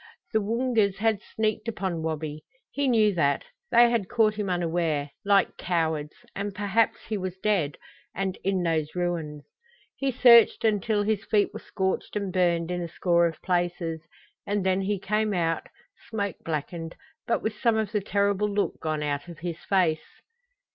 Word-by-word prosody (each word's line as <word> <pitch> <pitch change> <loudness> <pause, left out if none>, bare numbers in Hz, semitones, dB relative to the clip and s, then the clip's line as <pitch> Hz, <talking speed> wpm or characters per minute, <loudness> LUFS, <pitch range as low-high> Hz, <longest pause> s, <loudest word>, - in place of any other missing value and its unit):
The 220 - +3
Woongas 225 -2 +1
had 220 -1 +1
sneaked 215 0 -2
upon 190 -7 -2
Wabi. 155 -1 -4 0.3
He 285 -1 0
knew 220 -4 +4
that. 145 -5 +1 0.3
They 240 0 +6
had 225 -6 0
caught 220 -2 +3
him 210 -2 -3
unaware, 165 -5 0
like 200 -1 +3
cowards; 160 -4 -1 0.2
and 200 0 -4
perhaps 210 +2 +1
he 215 -2 -2
was 185 -1 -4
dead 190 -8 0 0.4
and 190 0 -1
in 190 -1 +1
those 160 -2 -1
ruins! 165 -5 -2 0.5
He 275 -1 -1
searched 235 -2 +6
until 210 0 +2
his 215 0 0
feet 205 -1 +2
were - - -6
scorched 190 +2 -2
and 200 -3 -2
burned 175 -2 +1
in 175 0 -2
a 170 - -3
score 170 0 +2
of 165 - -7
places, 175 -3 -1 0.5
and 205 -1 0
then 190 0 +2
he 200 +1 0
came 210 +2 0
out, 165 -2 0 0.4
smoke 200 -4 -2
blackened, 165 +1 -4 0.3
but 235 - 0
with 220 - -1
some 230 -3 +3
of 215 -2 -1
the 210 -2 0
terrible 200 +1 +1
look 205 0 -1
gone 155 -1 -2
out 145 +2 -2
of 170 -2 -9
his 170 0 -5
face. 180 -5 0
190 Hz, 170 wpm, -26 LUFS, 165-210 Hz, 0.5 s, They